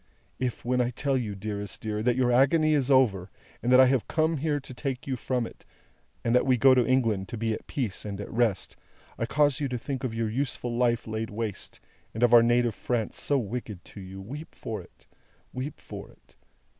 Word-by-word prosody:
"If, 125 -2 -3
when 125 +1 +2
I 120 - +1
tell 135 +3 -1
you, 110 -6 -2
dearest 100 0 -4
dear, 105 -1 -3
that 120 +1 +2
your 125 -1 +2
agony 155 +5 +4
is 140 -3 +1
over, 105 -9 +3 0.3
and 120 - 0
that 130 - +8
I 130 - +9
have 130 -2 +1
come 160 0 +1
here 145 0 0
to 130 - -10
take 130 0 -4
you 135 - -1
from 125 -1 -1
it, - - -12 0.6
and 115 - +1
that 125 - +5
we 130 -1 +4
go 135 +2 +7
to 125 -1 +4
England 115 -7 +1
to 120 - -5
be 115 0 0
at - - -7
peace 125 - -2
and 100 -2 -5
at 100 - -6
rest, 115 -4 0 0.4
I 115 - -1
cause 145 0 +2
you 145 - 0
to 125 -1 -3
think 130 +3 -4
of 120 -3 -2
your 115 -1 0
useful 120 0 -2
life 120 -1 +2
laid 110 0 -3
waste, 105 -1 -4 0.4
and 110 - -1
of 120 0 +5
our 120 - +10
native 120 0 +3
France 115 -1 -2
so 145 - +2
wicked 110 -5 -5
to 100 - -11
you, 95 +1 -9
weep 140 +11 -8
for - - -5
it, - - -20 0.5
weep 130 +3 -5
for - - -9
it! 65 +1 -23
120 Hz, 220 wpm, -27 LUFS, 110-130 Hz, 0.6 s, our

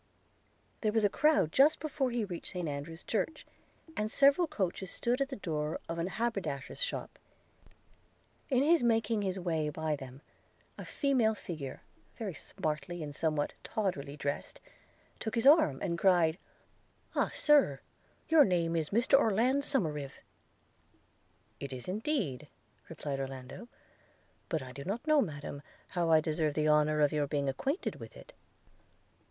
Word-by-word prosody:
There 215 - +1
was 220 -1 +2
a - - +4
crowd 300 - +3
just 285 - +5
before 285 -4 -1
he 235 -3 -1
reached 175 -4 -7
St 180 -3 -3
Andrew's 150 +4 -6
church, 265 +9 -2 0.5
and 215 0 -1
several 280 +8 +4
coaches 190 - -2
stood 245 +7 -1
at 275 - 0
the 270 - -4
door 155 -7 -3
of 165 0 -4
an 165 - 0
haberdasher's 195 - -3
shop. - - -3 1.3
In 260 -1 +3
his 330 +2 +4
making 225 -2 +2
his 190 -1 -1
way 165 -4 -1
by 155 0 -1
them, 135 -1 -10 0.5
a - - -8
female 255 -6 +2
figure, 150 -9 -7 0.3
very 210 -5 -4
smartly 155 +2 -4
and 145 -1 -6
somewhat 155 -1 0
tawdrily 150 -9 -2
drest, 140 0 -3 0.6
took 220 - -3
his 230 - 0
arm 280 - +6
and 170 -3 -1
cried 175 -3 +4 0.4
– - - -35
'Ah, - - +2
Sir! 285 - +4 0.5
Your 320 -2 +7
name 170 -5 +1
is 160 -2 -1
Mr 240 +5 +4
Orland 245 +5 +2
Somerive!' 155 - -2 1.4
'It 140 -1 -5
is, 125 -2 -6
indeed,' 190 - -2 0.4
replied 145 -3 -4
Orlando; 135 - -7 0.8
'but 160 -7 -1
I 130 - -9
do 140 +2 -8
not 215 - -4
know, 310 -2 +5
Madam, 145 - -5 0.3
how 175 -2 0
I 160 -1 +6
deserve 155 -1 -1
the 155 0 +1
honour 150 0 +3
of 145 0 +3
your 150 -1 +1
being 140 -1 -1
acquainted 270 - -2
with - - -11
it.' - - -14
175 Hz, 150 wpm, -32 LUFS, 150-235 Hz, 1.4 s, Your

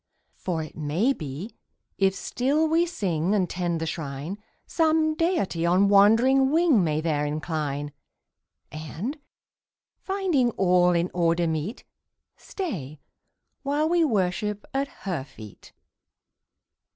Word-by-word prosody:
"For 165 -4 -3
it 155 - -11
may 160 - +1
be, 155 - -7 0.5
if 195 -1 +3
still 285 +10 0
we 330 +2 +2
sing 190 - -1
And 185 -3 +1
tend 175 -2 -2
the 160 - -2
Shrine, 155 +4 -5 0.3
Some 315 -1 +2
Deity 315 - 0
on 185 +4 +3
wandering 230 +7 +5
wing 310 - +4
May 155 -2 0
there 155 -3 0
incline; 150 -1 -3 0.8
And, 165 - -5 0.8
finding 370 -11 +1
all 180 -1 +4
in 170 +1 0
order 170 0 +2
meet, 160 - -3 0.5
Stay 155 - -6 0.6
while 290 +2 0
we 340 0 +3
worship 210 - -1
at 275 +1 0 0.2
Her 175 -8 -2
feet." 110 -7 -13
190 Hz, 115 wpm, -25 LUFS, -, 0.8 s, wandering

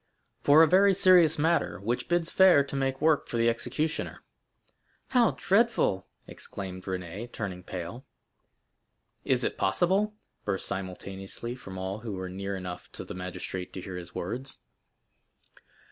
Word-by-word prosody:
"For 150 +3 +7
a - - +6
very 195 +3 +5
serious 180 -4 +6
matter, 165 - +1
which 115 +5 -2
bids 175 -1 +1
fair 185 -7 +6
to 140 - -7
make 135 -1 -1
work 155 -2 +3
for 120 - -3
the 115 0 +3
executioner." 150 +7 -2 0.9
"How 240 -6 +4
dreadful!" 195 - +2 0.2
exclaimed 95 -2 -8
Renée, 95 +5 -5
turning 95 -4 -5
pale. 90 +8 -7 1.2
"Is - - +2
it - - -2
possible?" 190 - +2 0.3
burst 95 -2 -2
simultaneously 95 +4 -5
from 95 -7 -9
all 95 +2 -4
who 110 -2 -5
were 95 -1 -4
near 100 +2 -4
enough 90 -2 -7
to - - -6
the - - -7
magistrate 90 0 -5
to - - -5
hear 95 0 -7
his 90 -1 -8
words. 120 +8 -5
115 Hz, 145 wpm, -28 LUFS, -, 1.2 s, For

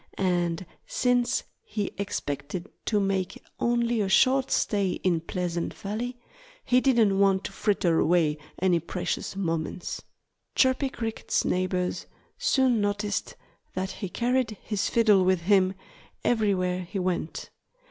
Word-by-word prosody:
And 175 -2 0 0.2
since 245 -1 +1 0.2
he 210 -2 -3
expected 175 -3 -4 0.2
to 210 - +2
make 195 -2 -1 0.2
only 235 -1 +1
a 195 - 0
short 260 +6 +4
stay 200 -3 +1
in 175 -3 +2
Pleasant 175 0 -3
Valley 235 +5 -4 0.5
he 250 0 +4
didn't 225 -7 +3
want 195 -1 +4
to - - -5
fritter 180 -6 +1
away 155 -3 +2 0.2
any 180 -2 +3
precious 175 +3 -3
moments. 170 -2 -3 0.5
Chirpy 260 +1 +3
Cricket's 225 -3 -2
neighbors 180 0 -1 0.3
soon 255 -5 +3
noticed 205 +1 -1 0.4
that 190 +1 -2
he 195 - -5
carried 240 -1 0
his 210 -1 -1
fiddle 215 -5 +5
with 185 -1 +2
him 190 +1 +3 0.5
everywhere 190 -6 +1
he 180 +3 -6
went. 180 -3 -2
195 Hz, 125 wpm, -27 LUFS, 180-225 Hz, 0.5 s, fiddle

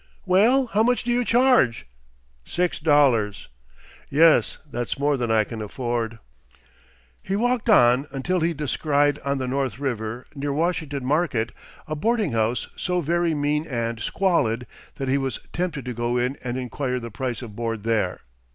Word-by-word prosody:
"Well 220 +9 +4
how 220 -3 +1
much 245 +2 +2
do 240 - -1
you 245 +1 +2
charge?" 240 - +3 0.6
"Six 175 - -1
dollars." 135 -10 +2 0.6
"Yes, 160 +3 +4
that's 120 -5 -4
more 145 +1 +2
than 120 -3 -2
I 110 -1 +4
can 110 0 -7
afford." 115 +1 -3 1.0
He 195 - -2
walked 240 +2 0
on 125 - +5
until 175 +7 -1
he 165 +1 +1
descried 145 0 +1
on 140 0 -2
the 130 -1 -3
North 130 -4 -1
River, 120 -3 -3
near 140 0 -3
Washington 155 -4 -1
Market, 140 -6 0 0.4
a 155 - -3
boarding 220 - 0
house 115 +1 0
so 180 -1 -1
very 170 +1 +1
mean 150 +2 0
and 115 -3 -2
squalid 125 - 0 0.3
that 135 - -4
he 135 +2 +2
was 135 -1 -3
tempted 165 -7 -2
to 125 - -3
go 120 +1 -1
in 125 +2 0
and 125 0 -3
inquire 125 0 -2
the 115 -1 -7
price 125 +3 -4
of 110 -4 -9
board 115 -2 -3
there. 110 -5 0
140 Hz, 160 wpm, -24 LUFS, 120-170 Hz, 1.0 s, on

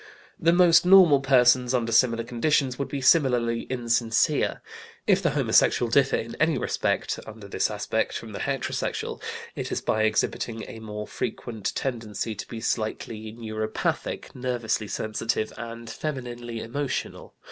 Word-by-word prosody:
The 165 - +4
most 175 -1 +6
normal 180 -6 +7
persons, 125 -1 +4
under 115 -2 0
similar 115 0 +3
conditions, 130 +2 0
would 140 - -1
be 140 0 -4
similarly 125 -5 +3
insincere. 115 -2 +1 0.5
If - - +3
the - - +2
homosexual 120 -2 +3
differ 135 +1 +4
in 115 +1 -4
any 155 +1 +3
respect, - - -1
under 110 -2 -10
this - - 0
aspect, - - -1
from - - -9
the - - -6
heterosexual, - - -3 0.3
it - - -4
is - - 0
by 110 - 0
exhibiting 110 +1 -1
a 110 - -9
more 105 -1 -6
frequent 115 -3 -4
tendency 115 -4 -3
to 105 - -7
be 115 -2 -7
slightly 110 0 -3
neuropathic, 110 -1 -3
nervously 120 -4 -2
sensitive, 110 +1 -2
and 115 0 -8
femininely 120 -4 -5
emotional. 135 +5 -4
120 Hz, 140 wpm, -26 LUFS, 110-130 Hz, 0.5 s, normal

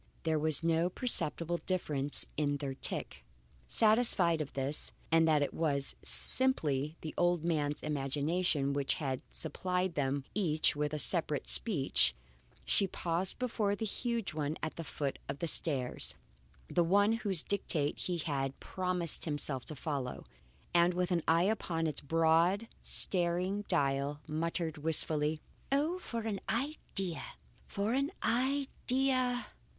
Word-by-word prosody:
There 160 -1 +1
was 155 0 +3
no 165 +1 +2
perceptible 175 -6 0
difference 145 -6 -1
in 145 -1 0
their 140 -1 -4
tick. 100 - -3 0.4
Satisfied 215 - +4
of 145 - -6
this 140 +2 -2 0.2
and 165 0 +4
that 150 -2 +3
it - - -3
was 140 -4 -1
simply 155 - +1
the 155 - -6
old 175 -2 +1
man's 150 -3 -1
imagination 145 +1 -1
which 140 -1 +1
had 135 -4 -3
supplied 180 +3 -2
them 140 -1 -1
each 160 -7 +2
with 150 +1 -2
separate 150 -3 +5
speech, 145 - +5 0.5
she 195 - +3
paused 175 +1 -1
before 220 -5 -1
the 220 - -4
huge 230 -2 -2
one 150 0 -3
at 160 - -3
the 165 - -6
foot 145 -2 -4
of 140 - -3
the 170 - -3
stairs, 135 -6 +1 0.5
the 175 - +1
one 200 +5 +3
whose 205 -7 +1
dictate 160 -7 -1
he 180 -1 -2
had 140 -4 -3
promised 180 -3 0
himself 145 -4 -1
to 155 - -5
follow, 140 -3 -4 0.5
and 175 +1 +3
with 180 0 -1
an 175 -1 +1
eye 165 +2 +4
upon 180 -5 -1
its 155 -3 0
broad, 165 +7 +2
staring 180 +3 +2
dial, 140 +1 0
muttered 160 0 -3
wistfully: 155 0 0 0.3
"Oh! 305 +6 +1
for 235 -9 -5
an 215 -3 -4
idea! 210 - -3 0.5
For 205 +3 -2
an 275 +4 0
idea!" 255 0 0
165 Hz, 135 wpm, -32 LUFS, 145-195 Hz, 0.5 s, separate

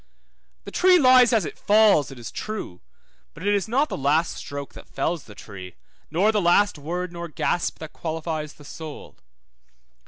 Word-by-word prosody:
The - - -9
tree 365 0 +5
lies 255 -4 +6
as 220 -7 +2
it - - -8
falls, 205 -8 +4
it 135 - -11
is 120 - -8
true, 215 - -6 0.5
but 165 - -9
it 205 - +3
is 200 -1 0
not 270 +7 +2
the - - -4
last 150 +5 +1
stroke 140 0 -7
that - - -13
fells 160 +3 -2
the 105 - -13
tree, 95 -4 -10 0.3
nor 185 +8 +2
the 210 -2 +1
last 175 0 +3
word 175 +4 -4
nor 170 0 -6
gasp 170 +2 -1
that 160 -1 -9
qualifies 160 -2 -4
the 145 - -16
soul. 155 +1 -10
170 Hz, 180 wpm, -24 LUFS, 145-210 Hz, 0.5 s, lies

